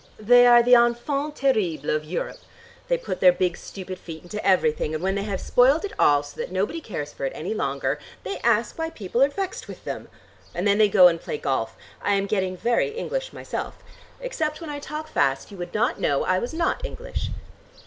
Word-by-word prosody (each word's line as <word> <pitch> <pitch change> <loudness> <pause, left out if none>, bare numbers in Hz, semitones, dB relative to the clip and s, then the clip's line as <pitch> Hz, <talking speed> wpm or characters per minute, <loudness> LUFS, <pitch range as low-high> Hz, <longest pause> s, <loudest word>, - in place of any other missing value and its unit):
They 245 +3 +6
are 240 0 +7
the 245 +1 +4
enfant 250 +5 +2
terrible 185 - 0
of 155 0 -1
Europe. 170 +4 -4 0.5
They - - +2
put 475 - -5
their 180 - +7
big 180 0 0
stupid 185 -1 -8
feet 160 -2 -9
into 210 +4 -6
everything 155 -4 +2
and 155 - -4
when 190 +1 +1
they 200 - -1
have 200 -3 -3
spoiled 275 +8 +3
it 405 - -6
all, 145 -1 +5
so 145 0 -8
that - - -5
nobody 200 - -1
cares 150 - -6
for - - -8
it 135 - -1
any 180 +8 -3
longer, 140 -6 -1 0.2
they 190 - -4
ask 235 +5 +1
why 325 0 -1
people 225 - -3
are 275 - +6
vexed 385 +5 -4
with - - -10
them! - - -5 0.5
And 180 +4 0
then 200 +1 +3
they 215 -1 +5
go 190 -3 +8
and 165 -1 0
play - - -4
golf. 115 -6 -2 0.3
I 205 - +2
am 195 0 0
getting 190 -2 -1
very 235 - +1
English - - -4
myself. - - -5 0.4
Except 320 -12 -3
when 325 -3 -6
I 290 - -5
talk 305 +2 -6
fast 135 - 0
you 200 - -10
would 175 +3 -7
not 230 +3 +1
know 140 -1 +1
I 185 0 +1
was 240 - -4
not 335 +7 0
English." - - -5
205 Hz, 215 wpm, -24 LUFS, 175-280 Hz, 0.5 s, go